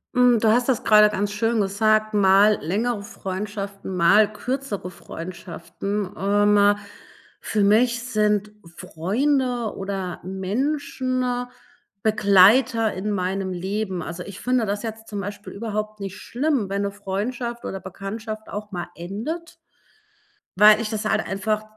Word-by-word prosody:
Hm, 250 -2 +5
du 220 - +4
hast 240 +2 +2
das 260 -4 +1
grade 210 -1 +6
ganz 205 0 -2
schön 225 +1 +1
gesagt, 215 +2 +2
mal 200 +1 +5
längere 210 +7 -1
Freundschaften, 200 0 -6
mal 200 +5 +5
kürzere 245 -5 -4
Freundschaften. 180 +3 -6
Ähm, 205 +1 +4 0.6
für 215 - -1
mich 235 +4 +3
sind 210 -3 +1 0.2
Freunde 240 - -1
oder 195 -2 -4
Menschen 255 - -2 0.8
Begleiter 220 +3 +5
in 200 +3 -3
meinem 190 0 -2
Leben. 190 +1 -3
Also, 170 +2 -6
ich 195 0 -9
finde 250 -2 +1
das 205 +1 -3
jetzt 220 -1 -6
zum 205 -2 -4
Beispiel 205 +1 -7
überhaupt 215 0 -4
nicht 195 -1 -6
schlimm, 265 -4 -1
wenn 200 +1 -1
'ne 200 0 -1
Freundschaft 230 +5 -4
oder 195 - -4
Bekanntschaft 215 +4 -7
auch 210 +1 -6
mal 175 -2 -4
endet 230 - -6 1.0
weil 210 +2 +7
ich 220 - -3
das 215 -1 -3
halt - - +1
einfach 215 +2 -1
210 Hz, 130 wpm, -23 LUFS, 195-225 Hz, 1.0 s, weil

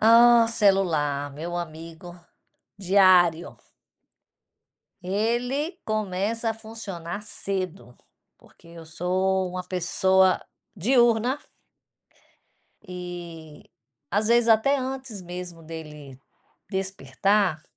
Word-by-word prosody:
Ah, 235 +1 +7
celular, 170 -10 +1
meu 170 +4 -5
amigo 165 +1 -8 0.6
diário. 185 -3 +4 1.5
Ele 240 - -1
começa 215 +2 -1
a 225 - -3
funcionar 210 -5 -7
cedo, 190 -9 -4 0.4
porque - - -22
eu 170 -1 -12
sou 185 +3 0
uma 180 0 -5
pessoa 190 +1 +2 0.3
diurna. 240 - +2 1.5
E, 175 -4 -9 0.5
às 210 +3 +1
vezes, 235 0 +4
até 230 +6 +4
antes 260 -5 -5
mesmo 175 -1 -8
dele 150 -4 -10 0.5
despertar 190 -1 0
190 Hz, 80 wpm, -25 LUFS, 170-220 Hz, 1.5 s, Ah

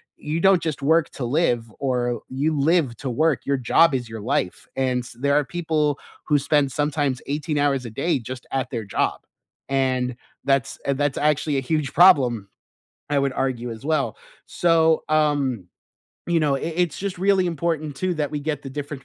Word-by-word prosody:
you 155 +3 -3
don't 190 -1 +4
just 150 -3 -3
work 160 +2 +3
to 130 - -5
live, 120 -4 +1
or 125 -3 -1
you 145 +3 -1
live 150 -5 +2
to 135 -3 -4
work, 155 +4 +1
your 140 -1 +2
job 135 +4 +4
is 120 -2 -3
your 110 -2 -7
life, 100 -5 -2
and 130 -1 +1
s 125 - -12
there 140 +1 +1
are 150 0 +4
people 155 -3 -1 0.3
who 150 -1 +4
spend 140 -1 +1
sometimes 145 -2 0
18 150 +2 -2
hours 140 -3 +1
a - - -5
day 140 +6 0
just 125 +2 -8
at 135 -1 -1
their 115 -5 -4
job, 95 - -1 0.5
and 130 -2 0 0.3
that's, 135 -3 +1
uh, 140 - +3
that's 145 0 -1
actually 150 -1 +1
a - - 0
huge 150 0 -1
problem, 125 - +5 0.6
I 145 - +1
would 135 -1 0
argue 125 -3 -2
as 110 +2 -9
well. 145 -8 0 0.3
So, 160 -2 +2
um, 145 - +1 0.6
you 170 -1 +2
know, 145 -2 +2
i - - -5 0.2
it's 170 - -2
just 195 -2 -4
really 190 -1 +3
important 155 -3 -2
too 185 +2 -1
that 150 -3 -2
we 150 -1 -3
get 150 -1 -3
the 135 - -7
different 145 -1 -6
145 Hz, 190 wpm, -23 LUFS, 130-155 Hz, 0.6 s, problem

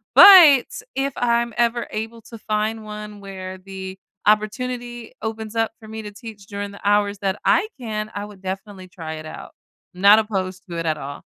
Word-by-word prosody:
but, 335 -10 +10 0.3
if 275 +1 0
I'm 235 -1 +1
ever 235 0 +1
able 225 +1 -5
to 230 0 -11
find 215 +1 -2
one 210 0 -8
where 190 -1 -7
the 190 0 -8 0.3
opportunity 240 +3 -1
opens 220 0 -5
up 225 -1 +1
for 220 - -13
me 220 0 -6
to 210 - -7
teach 205 -1 -11
during 205 -1 -5
the 200 - -12
hours 205 0 +2
that 195 0 -2
I 430 - +4
can, 215 -2 -4
I 205 0 -4
would 205 -2 -13
definitely 190 0 -6
try 165 -4 -7
it 155 - -8
out? 155 - -9 0.4
Not 200 +4 +6
opposed 190 -4 -3
to 170 - -5
it 165 - -3
at 155 -1 0
all. 140 0 -7
210 Hz, 185 wpm, -22 LUFS, 195-225 Hz, 0.4 s, but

